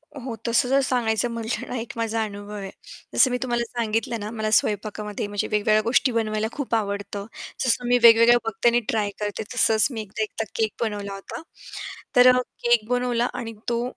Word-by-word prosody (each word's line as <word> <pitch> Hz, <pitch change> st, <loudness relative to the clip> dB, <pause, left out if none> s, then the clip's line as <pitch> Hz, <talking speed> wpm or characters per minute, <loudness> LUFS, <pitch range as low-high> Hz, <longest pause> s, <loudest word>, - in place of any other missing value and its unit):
हो, 255 Hz, -4 st, -6 dB
तसं 240 Hz, +2 st, +2 dB
जर 270 Hz, +1 st, +4 dB
सांगायचं 240 Hz, -3 st, +1 dB
म्हटलं 230 Hz, 0 st, -4 dB
ना, -, -, -4 dB
एक 225 Hz, -, -7 dB
माझा 225 Hz, -1 st, -1 dB
अनुभव 205 Hz, 0 st, -7 dB
आहे. 195 Hz, -2 st, -6 dB, 0.4 s
जसं 260 Hz, -, +5 dB
मी 250 Hz, -, 0 dB
तुम्हाला 240 Hz, -2 st, -1 dB
सांगितलं 230 Hz, 0 st, -2 dB
ना, 205 Hz, 0 st, -5 dB
मला 220 Hz, -1 st, -2 dB
स्वयंपाकामध्ये 210 Hz, -1 st, 0 dB
म्हणजे 205 Hz, 0 st, -2 dB
वेगवेगळ्या 215 Hz, 0 st, +2 dB
गोष्टी 250 Hz, +3 st, +2 dB
बनवायला 220 Hz, -2 st, -1 dB
खूप 270 Hz, -4 st, -2 dB
आवडतं. 200 Hz, -1 st, -3 dB, 0.4 s
जसं 245 Hz, 0 st, +1 dB
मी 245 Hz, 0 st, +4 dB
वेगवेगळ्या 230 Hz, +1 st, +8 dB
बघते 225 Hz, +2 st, +2 dB
आणि 240 Hz, +1 st, +3 dB
ट्राय 210 Hz, -2 st, 0 dB
करते. 210 Hz, +1 st, -3 dB
तसंच 220 Hz, -3 st, +4 dB
मी 225 Hz, -3 st, -4 dB
एकदा 210 Hz, +1 st, -6 dB
एकदा 215 Hz, +1 st, -4 dB
केक 220 Hz, -2 st, 0 dB
बनवला 205 Hz, -3 st, -3 dB
होता. 195 Hz, +8 st, -8 dB, 0.7 s
तर 250 Hz, 0 st, +7 dB
अ, -, -, +3 dB, 0.2 s
केक 235 Hz, -3 st, +3 dB
बनवला 245 Hz, -1 st, +1 dB
आणि 225 Hz, -2 st, -5 dB, 0.2 s
तो 235 Hz, 0 st, 0 dB
225 Hz, 185 wpm, -24 LUFS, 210-240 Hz, 0.7 s, वेगवेगळ्या